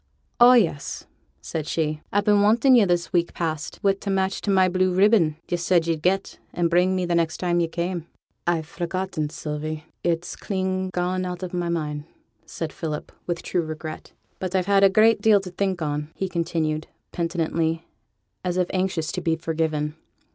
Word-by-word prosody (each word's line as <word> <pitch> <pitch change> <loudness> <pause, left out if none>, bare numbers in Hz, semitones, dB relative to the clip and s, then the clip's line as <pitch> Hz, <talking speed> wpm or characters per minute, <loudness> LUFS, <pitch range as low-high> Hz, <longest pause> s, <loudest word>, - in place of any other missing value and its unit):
'Oh, 245 +1 +9
yes,' 175 - +1 0.4
said 155 -2 -4
she. 155 -2 -1
'I've 205 0 +1
been 205 -1 +5
wanting 230 +6 +5
yo' 230 -5 +6
this 175 -2 0
week 170 -1 +1
past 160 -3 -3
wi' 195 -1 +4
t' 200 +1 -7
match 195 0 0
to - - -3
my 190 -1 +5
blue 185 0 +2
ribbon 190 -4 +4
yo' 175 - 0
said 170 -1 +2
yo'd 165 -2 -1
get 190 +3 0
and 170 -1 0
bring 180 +2 +3
me 185 -1 0
next 170 -2 +1
time 175 -1 +1
yo' 170 - +2
came.' 170 0 -3 0.4
'I've 165 -2 +1
forgotten 175 -1 -3
it, 145 - -6
Sylvie. 155 -1 -5 0.2
It's 170 0 -1
clean 190 -1 -2
gone 180 +1 -1
out 180 0 -4
of 185 - -5
my 175 -1 -1
mind,' 150 -3 -2 0.4
said 160 -2 -5
Philip, 155 -3 -5 0.2
with 170 -1 -2
true 180 - 0
regret. 155 -1 -7 0.3
'But 185 0 -3
I've 185 -1 +2
had 200 0 +4
a 215 +4 +6
deal 210 -1 +4
to 190 -2 -8
think 185 -2 -1
on,' 150 0 -2
he 190 - -2
continued, 160 -3 -1 0.2
penitently, 165 -1 -1 0.6
as 180 -1 -1
if 180 -1 +1
anxious 185 -4 -1
to 180 - -3
be 165 -2 +1
forgiven. 160 -2 -1
175 Hz, 185 wpm, -24 LUFS, 160-190 Hz, 0.6 s, Oh